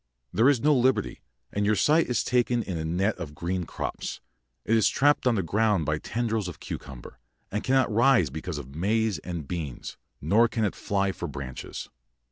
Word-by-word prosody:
There 115 +8 +5
is 140 -4 +3
no 150 +1 +4
liberty, 130 +1 +1 0.3
and 100 - 0
your 105 +1 +3
sight 155 +8 +3
is 125 - 0
taken 120 -1 +1
in 95 -3 -4
a 80 - -3
net 90 +7 0
of 75 -4 -6
green 90 +2 -2
crops; - - -5 0.5
it 115 - +3
is 110 -3 +4
trapped 145 -1 +3
on 120 - +3
the 95 - 0
ground 105 -1 +1
by 75 0 0
tendrils 110 -1 -2
of 90 - -8
cucumber, 65 -3 -8 0.3
and 105 +2 -2
cannot 130 -4 +2
rise 120 - +4
because 80 +2 -5
of 70 -2 -8
maize 105 +6 0
and 85 -5 -6
beans, 80 -7 -5 0.2
nor 105 +10 +4
can 115 -2 -1
it 100 - -1
fly 100 -1 0
for 85 - -5
branches. 70 -3 -7
100 Hz, 190 wpm, -27 LUFS, 85-115 Hz, 0.5 s, There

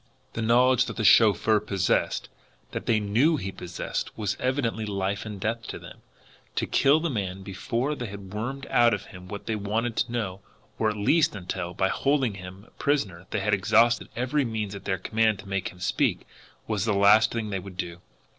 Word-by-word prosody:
The 115 - -3
knowledge 125 +2 +4
that - - -6
the 110 - -1
chauffeur 110 0 +5
possessed, 100 -3 0 0.4
that - - -5
they 110 -2 +3
KNEW 120 +11 +2
he 95 -7 -4
possessed, 90 -1 -5
was 105 -2 -1
evidently 125 -4 0
life 100 0 -2
and 105 -2 -6
death 115 +3 -2
to - - -5
them. - - -12 0.6
To - - 0
kill 140 +3 +4
the 165 -1 -1
man 95 -4 -3
before 120 +8 -2
they 125 -5 -5
had 100 -1 -9
wormed 135 +6 -4
out 120 -2 +5
of 105 - -8
him 90 0 -12
what 100 +2 -7
they 115 - -1
wanted 110 +3 -1
to 120 - 0
know, 100 -6 -3 0.4
or, 110 - +3
at 105 - -4
least, 155 +9 +3
until, 90 -1 -5
by 95 - +1
holding 135 -5 +1
him 95 +1 -10
a - - -23
prisoner, 95 - -1
they 105 - -1
had 105 +2 +1
exhausted 115 +4 +3
every 130 +4 +1
means 110 -4 -3
at 100 -1 -9
their 95 -1 0
command 110 +3 +1
to 100 - -12
make 95 -1 -2
him 90 - -15
speak, 90 - 0 0.4
was 105 -2 -1
the 105 -3 +1
last 105 +3 +6
thing 110 -3 -3
they 95 - -1
would 95 0 -10
do! 85 -1 -5
105 Hz, 200 wpm, -26 LUFS, 95-120 Hz, 0.6 s, last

